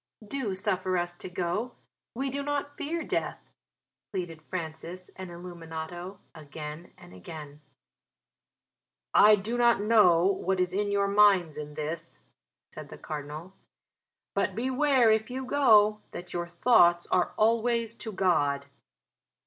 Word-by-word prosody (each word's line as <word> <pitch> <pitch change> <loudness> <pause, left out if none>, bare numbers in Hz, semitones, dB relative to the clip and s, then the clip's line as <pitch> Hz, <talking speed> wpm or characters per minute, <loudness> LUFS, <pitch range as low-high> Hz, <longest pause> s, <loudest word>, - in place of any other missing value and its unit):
"Do 230 -6 -3
suffer 185 -2 -1
us 175 0 -2
to 185 - -8
go, 185 +7 -3 0.4
we 270 +2 -2
do 280 +2 -3
not 285 0 -3
fear 330 +3 -3
death," - - -3 0.6
pleaded 175 -5 -5
Francis 170 +2 -7
and 190 -1 -8
Illuminato, 175 +1 -7 0.2
again 150 +1 -9
and 90 - -15
again. 145 - -10 1.5
"I 210 +1 +8
do 220 +4 -4
not 235 -3 +4
know 205 -6 +5
what 190 -1 0
is 180 0 0
in 205 +1 0
your 200 0 +1
minds 200 -5 +4
in 150 -1 -7
this," 155 - -5 0.6
said - - -9
the - - -10
Cardinal, 155 +4 -7 0.8
"but 200 -1 0
beware 260 0 +3
if 220 +1 +1
you 260 +1 -4
go 215 -6 +4
that 175 0 -8
your 175 0 -3
thoughts 175 -2 +4
are 180 - +1
always 230 +1 +2
to 220 - -6
God." 145 -8 +1
185 Hz, 135 wpm, -28 LUFS, 170-220 Hz, 1.5 s, I